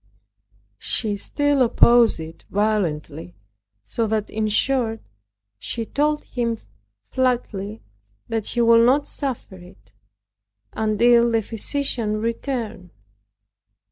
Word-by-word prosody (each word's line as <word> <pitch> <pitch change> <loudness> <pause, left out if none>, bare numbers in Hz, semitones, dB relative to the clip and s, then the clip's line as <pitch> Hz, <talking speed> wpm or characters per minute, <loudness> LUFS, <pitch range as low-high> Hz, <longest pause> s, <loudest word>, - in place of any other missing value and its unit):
She 215 -3 +2
still 290 +6 0
opposed 235 -3 +5
it 160 0 -9
violently 175 - -2 0.5
so 225 - -2
that 215 -1 -2
in 215 0 -1
short 225 +1 +1 0.6
she 230 - -4
told 300 +5 0
him 235 -2 -2 0.5
flatly 225 -5 -1 0.4
that 225 -2 -2
she 240 - 0
would 230 0 +6
not 270 +4 +3
suffer 255 -8 -5
it, 105 - -17 0.8
until 235 +2 +3
the 225 -1 +1
physician 225 -1 -1
returned. 230 -4 -4
225 Hz, 100 wpm, -22 LUFS, 210-245 Hz, 0.8 s, would